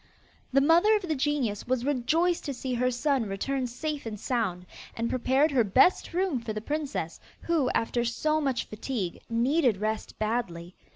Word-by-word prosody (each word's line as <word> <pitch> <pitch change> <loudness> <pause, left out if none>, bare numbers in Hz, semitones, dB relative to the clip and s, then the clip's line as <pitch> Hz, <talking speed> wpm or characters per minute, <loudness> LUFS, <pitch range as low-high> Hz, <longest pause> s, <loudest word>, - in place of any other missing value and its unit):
The 275 +1 +4
mother 340 +9 +5
of 415 - -1
the 330 -3 -1
genius 265 -8 -1
was 255 -1 0
rejoiced 315 +6 +1
to 280 -3 -3
see 255 0 -4
her 250 +1 +1
son 255 -1 0
return 255 +7 -2
safe 290 +2 -4
and 210 -2 -5
sound, 195 -9 -1 0.3
and 230 +1 -1
prepared 265 +4 +2
her 255 -4 +3
best 255 - +3
room 355 -6 0
for 230 -2 -5
the 215 - -3
princess, 275 - -3 0.2
who, 320 -7 +1
after 235 +1 0
so 305 +7 0
much 265 -5 -1
fatigue, 215 -4 -4
needed 245 0 +2
rest 215 +2 -3
badly. 195 -6 -2
255 Hz, 170 wpm, -28 LUFS, 225-295 Hz, 0.3 s, mother